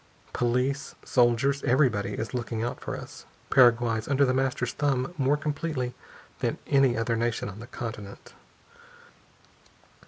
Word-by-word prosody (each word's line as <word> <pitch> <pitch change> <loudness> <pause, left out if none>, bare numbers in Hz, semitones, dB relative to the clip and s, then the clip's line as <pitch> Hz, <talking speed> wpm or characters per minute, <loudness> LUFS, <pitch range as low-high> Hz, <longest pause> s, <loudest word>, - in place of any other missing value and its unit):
Police, 125 +4 0
soldiers 130 +3 +2
everybody 125 -5 +2
is 115 - -4
looking 120 -2 -3
out 120 - -4
for - - -4
us. - - -11 0.2
Paraguay's 120 -3 +4
under 140 0 +3
The 130 - +1
Master's 130 -2 0
thumb 140 +1 0
more 140 0 +2
completely 145 -4 -3 0.5
than - - -1
any 135 -4 +3
other 115 +1 0
nation 115 0 -1
on 100 +1 -8
the 120 - -9
continent." 110 -5 -8
125 Hz, 130 wpm, -27 LUFS, 115-135 Hz, 0.5 s, Paraguay's